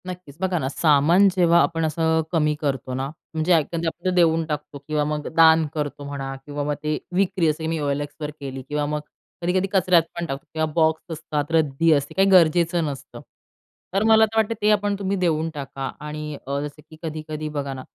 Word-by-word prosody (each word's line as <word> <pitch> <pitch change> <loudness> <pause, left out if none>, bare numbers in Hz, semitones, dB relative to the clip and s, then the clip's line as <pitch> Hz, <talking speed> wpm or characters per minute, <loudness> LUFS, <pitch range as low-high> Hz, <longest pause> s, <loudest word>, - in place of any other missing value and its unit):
नक्कीच 180 -6 -8
बघा 185 -1 0
ना, 130 - -2
सामान 155 +6 +4
जेव्हा 170 -2 +5
आपण 165 -1 0
असं 160 +1 +1
कमी 150 -3 +2
करतो 135 -3 -2
ना 130 +1 -2 0.3
म्हणजे 160 +3 +2
आपण 165 +2 0
देऊन 165 -2 +3
टाकतो 150 -2 -5
किंवा 150 -1 0
मग 150 0 -3
दान 160 -1 +6
करतो 145 -2 -4
म्हणा 135 -1 -5
किंवा 145 0 -4
मग 150 +1 -1
ते 150 0 0 0.2
विक्री 185 -2 +2
जसं 160 +1 -5
मी 165 -1 -1
OLXवर 145 +1 -3
केली 135 -2 -6
किंवा 150 0 -1
मग 150 +1 -2 0.4
कधी-कधी 185 +2 +1
कचऱ्यात 180 -3 +4
पण 170 - -3
टाकतो 135 -3 -5
किंवा 160 0 0
बॉक्स 160 -1 +2
असतात, 155 -1 -3
रद्दी 160 0 +2
असते 140 -1 -1
काही 195 +1 +4
गरजेचं 170 -1 +4
नसतं. 140 -3 -7 0.7
तर 195 +2 +2
मला 220 0 +7
तर 220 +1 -6
वाटते 220 0 +2
ते 210 - +3
आपण 205 -1 +1
तुम्ही 200 0 -1
देऊन 165 -3 +1
टाका 135 -2 -5
आणि 150 0 -6
अ, 140 +1 -1
जसं 150 +1 -7
की 155 - -13
कधी-कधी 155 -1 -5
बघा 140 -1 -2
ना, 130 - -7
155 Hz, 190 wpm, -23 LUFS, 145-170 Hz, 0.7 s, मला